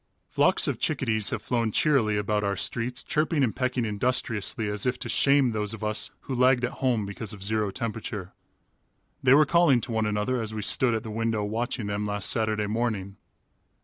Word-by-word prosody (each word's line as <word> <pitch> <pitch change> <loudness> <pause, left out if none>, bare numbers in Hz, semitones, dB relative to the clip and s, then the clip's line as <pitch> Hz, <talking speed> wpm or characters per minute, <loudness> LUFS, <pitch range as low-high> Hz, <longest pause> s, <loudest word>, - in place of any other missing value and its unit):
Flocks - - +3
of - - -2
chickadees 110 -2 +1
have - - -4
flown 115 -3 0
cheerily 115 -6 +2
about 105 0 0
our 100 0 0
streets, 120 +5 -2
chirping 150 -1 0
and 115 - 0
pecking 130 -1 -1
industriously, 110 -1 0
as 105 +2 -2
if 125 - 0
to - - -6
shame 140 -3 +3
those 105 0 -2
of 110 - -10
us 105 0 -1
who 135 - -6
lagged 125 0 +3
at 125 - -4
home 120 -6 +1
because 100 +2 -5
of 100 -2 -9
zero 105 0 0
temperature. 110 -4 -5 0.9
They 130 +1 +6
were 150 +1 +6
calling 165 -5 +4
to - - -5
one 110 -1 0
another 105 +4 -1
as 110 -1 -4
we 105 - -3
stood 120 +2 +2
at 110 - -3
the 110 - -7
window 115 -1 -1
watching 115 +2 -2
them 100 0 -2
last 105 -1 -1
Saturday 110 -2 0
morning. 105 -3 -2
110 Hz, 195 wpm, -26 LUFS, 105-125 Hz, 0.9 s, They